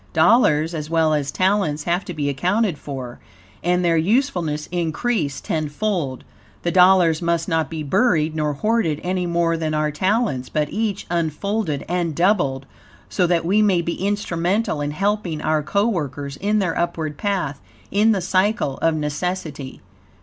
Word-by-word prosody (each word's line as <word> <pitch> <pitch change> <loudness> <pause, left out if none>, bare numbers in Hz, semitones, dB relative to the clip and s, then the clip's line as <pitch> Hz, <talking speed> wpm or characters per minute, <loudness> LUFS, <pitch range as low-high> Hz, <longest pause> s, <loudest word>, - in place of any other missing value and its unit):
Dollars, 160 -3 +4
as 155 -2 -4
well 160 -1 +2
as 145 -2 0
talents, 185 -6 +1
have 175 +4 0
to 180 - -6
be 145 -2 -1
accounted 180 +5 0
for, 130 -4 -7 0.4
and 180 +1 +1
their 165 -1 +3
usefulness 175 - 0
increased 170 - -1
tenfold. 155 -2 -2 0.4
The 175 - 0
dollars 180 -3 +5
must 170 -1 0
not 160 -3 0
be 160 -1 -4
buried 160 - +2
nor 150 -1 0
hoarded 190 -2 0
any 180 0 -1
more 170 -1 +1
than 155 -1 -2
our 150 0 0
talents, 185 - 0
but 150 -1 -1
each, 215 -2 -2
unfolded 170 0 -1
and 170 -3 -1
doubled, 170 -8 +1 0.4
so 180 -3 +1
that 170 -1 +1
we 200 +5 +3
may 190 -5 +3
be 170 - -2
instrumental 195 -2 -1
in 145 - -1
helping 195 0 -1
our 155 0 +1
coworkers 150 - -1
in 205 +7 0
their 185 -5 0
upward 160 -3 -2
path, 185 -9 -2 0.3
in 210 +3 +4
the 200 -3 +1
Cycle 185 -5 0
of 165 -1 +2
Necessity. 150 -2 -4
170 Hz, 155 wpm, -21 LUFS, 150-195 Hz, 0.4 s, dollars